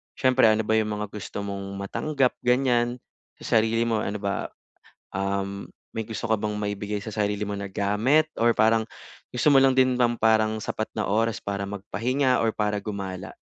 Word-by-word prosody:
siyempre 130 -1 +4
ano 110 0 +4
ba 110 - +3
yung 105 -1 0
mga 105 - -3
gusto 105 -1 -6
mong 100 -1 -5
matanggap, 135 +5 0
ganyan? 125 -1 +2 0.4
Sa - - +2
sarili 115 +1 +1
mo 110 -2 +1
ano 105 +1 -4
ba, 100 -2 -2 0.7
um, 100 +1 -2 0.2
may 110 - -3
gusto 110 -2 -5
ka 110 - +4
bang 105 0 -2
maibigay 105 0 -3
sa 110 - -5
sarili 105 -1 -1
mo 105 - -4
na 100 -1 -5
gamit 105 +11 +2
or 115 0 +5
parang 110 0 +4 0.5
gusto 125 +4 +2
mo 135 - +7
lang 135 0 +5
din 130 -1 +4
ng 120 -1 +2
parang 110 -1 +3
sapat 110 - -3
na - - 0
oras 110 +2 +1
para 100 0 -3
magpahinga 125 +6 0
or 115 - +2
para 105 -1 0
gumala? 95 -3 -6
110 Hz, 180 wpm, -25 LUFS, 100-120 Hz, 0.7 s, mo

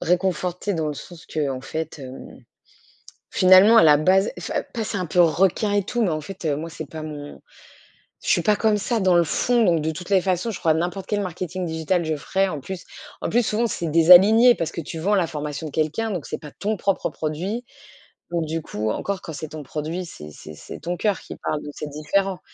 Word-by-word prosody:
réconfortée 180 +2 0
dans 160 -2 -1
le 150 - -3
sens 165 +4 -11
qu'en 140 -4 -2
fait, 160 +3 -5
hem, 130 -1 -10 0.9
finalement, 190 +5 +7
à 225 - +8
la 150 -2 +7
base 190 +6 +3
enfin, - - -2
pas 225 -2 -2
c'est 200 - -4
un 180 - -2
peu 175 +3 +2
requin 190 +5 +3
et 205 -2 +1
tout, 240 +2 -1
mais 190 - +2
en 155 0 -1
fait, 190 +3 -9
heu, 145 -2 +1
moi, 165 +2 -6
c'est 160 -2 -7
pas 155 +2 -7
mon 145 -2 -8 0.9
je - - -1
suis - - +4
pas 210 -1 +3
comme 215 0 +2
ça 225 +2 -1
dans 185 -2 +4
le 170 -1 +4
fond. 240 +8 +2
Donc 170 -4 +3
de 160 - -1
toutes 175 +4 -8
les 190 -2 +4
façons, 185 +4 -1
je 200 - -5
crois 160 -1 +3
que - - -1
n'importe 180 +3 -3
quel 210 -1 0
marketing 185 0 -4
digital 165 +2 -1
je 160 0 -1
ferais, 190 +6 0
en 155 -5 -4
plus 190 +4 -7 0.4
en - - -2
plus, 240 +2 +3
souvent, 230 +3 +1
c'est 170 -6 -3
désaligné 190 +9 +7
parce 165 0 -3
que - - -6
tu 160 +2 -7
vends 200 +6 +1
la 180 -4 +2
formation 150 0 -5
de 150 - -8
quelqu'un, 160 +9 -1
donc 175 -6 -4
c'est 155 - -5
pas 150 - -10
ton 215 +1 -1
propre 195 +1 0
produit. 180 +10 -4 0.7
Donc 170 -2 -1
du 160 +1 -3
coup 110 -6 -3
encore 195 - -3
quand 160 - -7
c'est 155 +1 -6
ton 155 -1 -8
produit, 155 +6 -4
c'est 75 - -10
c'est 80 - -11
c'est - - -10
ton 175 +4 -3
coeur 210 -3 +1
qui - - -9
parle, 150 - -3
donc 145 - -8
c'est 150 - -6
différent. 185 +6 -1
175 Hz, 235 wpm, -23 LUFS, 155-195 Hz, 0.9 s, à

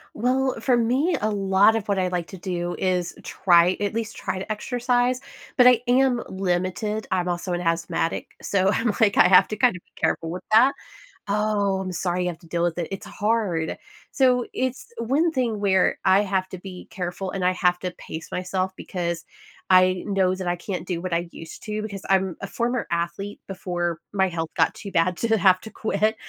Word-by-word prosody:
Well, 260 +3 +1
for 255 - +2
me, 255 +9 +2
a 215 - +1
lot 200 +1 +4
of 210 - -5
what 200 - +1
I 185 -1 +1
like 175 -2 -2
to 190 - -9
do 175 -1 -3
is 180 -2 -1
try 175 0 +3
at 205 +1 -1
least 225 -1 -4
try 185 - -3
to 195 - -5
exercise, 245 +3 0 0.3
but 250 - +6
I 250 -2 +6
am 250 -1 +3
limited. 190 +3 -2
I'm 180 -1 0
also 175 +1 -2
an 175 - -2
asthmatic, 165 -1 -1
so 190 -1 +1
I'm 230 +1 +1
like 210 -3 +4
I 180 - +7
have 185 -1 +7
to 215 - -2
kind 240 -1 +3
of 175 - -14
be - - -37
careful 165 - -1
with 180 +2 -6
that. 245 +6 +6 0.5
Oh, 205 -1 +1
I'm 190 -1 -4
sorry 180 +1 -1
you 180 - 0
have 170 - -7
to 170 - -17
deal 170 +1 -1
with 175 -1 0
it. 170 - -2
It's 195 - -6
hard. 205 -7 -1 0.3
So, 250 -2 +3
it's 260 -1 -3
one 275 +9 +1
thing 240 -7 -1
where 190 -2 +2
I 190 +1 +5
have 190 -2 -1
to 185 - -7
be 185 0 -10
careful, 185 -1 -4
and 185 -1 -2
I 180 - +4
have 180 -1 +2
to 180 0 -3
pace 160 -2 -9
myself 185 +1 -2
because 170 -3 -4 0.5
I 185 0 +5
know 190 -2 +1
that 185 -1 -5
I 175 - +1
can't 180 -1 -5
do 175 -2 -2
what 185 -1 -3
I 170 +1 0
used 165 -1 -10
to, 215 0 -3
because 200 -3 -6
I'm 190 -2 +2
a - - -3
former 240 +4 -1
athlete, 170 +4 -3
before 175 -3 -3
my 190 -1 +2
health 165 -3 -3
got - - +2
too 200 - -8
bad 175 +1 +1
to 225 -1 +1
have 185 -2 +5
to 220 - -10
quit. 215 +1 0
190 Hz, 210 wpm, -24 LUFS, 180-220 Hz, 0.5 s, I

